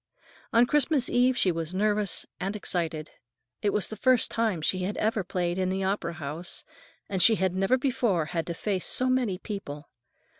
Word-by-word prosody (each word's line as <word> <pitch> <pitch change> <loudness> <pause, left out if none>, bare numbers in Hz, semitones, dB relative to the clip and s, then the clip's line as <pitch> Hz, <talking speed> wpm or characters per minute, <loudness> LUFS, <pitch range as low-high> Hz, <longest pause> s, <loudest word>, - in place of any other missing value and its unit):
On 230 +1 +5
Christmas 290 -1 +2
Eve 250 +1 +3
she 185 - +3
was 165 +1 -4
nervous 210 0 +1
and 195 +3 -3
excited. 165 -6 -3 0.5
It 205 - +2
was 210 - 0
the 220 - -6
first 250 +2 +3
time 225 -6 0
she 185 - +1
had 185 +3 -3
ever 215 -1 0
played 180 0 -2
in 185 -1 +1
the 190 +1 -1
opera 190 -3 -1
house, 155 +3 -5 0.4
and 190 -2 -1
she 220 +6 +7
had 190 -3 0
never 195 +7 +2
before 240 - +1
had 165 -2 -1
to 170 - -3
face 190 0 -2
so 255 0 +2
many 245 -8 +1
people. 160 -9 -7
195 Hz, 185 wpm, -27 LUFS, 175-230 Hz, 0.5 s, she